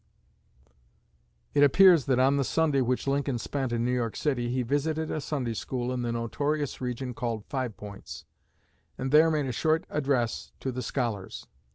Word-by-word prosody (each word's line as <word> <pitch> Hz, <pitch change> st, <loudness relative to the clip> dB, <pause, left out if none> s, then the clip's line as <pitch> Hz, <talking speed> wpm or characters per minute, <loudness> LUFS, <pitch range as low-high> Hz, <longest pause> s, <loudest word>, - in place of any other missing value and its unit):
It 145 Hz, -, +3 dB
appears 165 Hz, +1 st, +7 dB
that 130 Hz, -2 st, +2 dB
on 135 Hz, +2 st, +4 dB
the 140 Hz, -, +2 dB
Sunday 150 Hz, -1 st, +2 dB
which 125 Hz, 0 st, 0 dB
Lincoln 140 Hz, -2 st, 0 dB
spent 130 Hz, +1 st, -3 dB
in 120 Hz, 0 st, 0 dB
New 125 Hz, -, +1 dB
York 120 Hz, -3 st, -1 dB
City 125 Hz, -5 st, -1 dB
he 125 Hz, +1 st, 0 dB
visited 150 Hz, +5 st, -1 dB
a 155 Hz, -, -2 dB
Sunday 130 Hz, -6 st, -2 dB
School 125 Hz, +2 st, -3 dB
in 125 Hz, -, -2 dB
the 120 Hz, -1 st, -1 dB
notorious 145 Hz, +6 st, -2 dB
region 125 Hz, 0 st, -3 dB
called 115 Hz, -3 st, -3 dB
Five 130 Hz, -5 st, -3 dB
Points, 100 Hz, -1 st, -9 dB, 0.7 s
and 130 Hz, +1 st, -3 dB
there 155 Hz, +2 st, +6 dB
made 150 Hz, -3 st, 0 dB
a 130 Hz, -, -2 dB
short 155 Hz, +6 st, +1 dB
address 135 Hz, -5 st, -1 dB
to 130 Hz, -, -3 dB
the 125 Hz, +1 st, -4 dB
scholars. 115 Hz, -5 st, -3 dB
130 Hz, 175 wpm, -28 LUFS, 120-145 Hz, 0.7 s, appears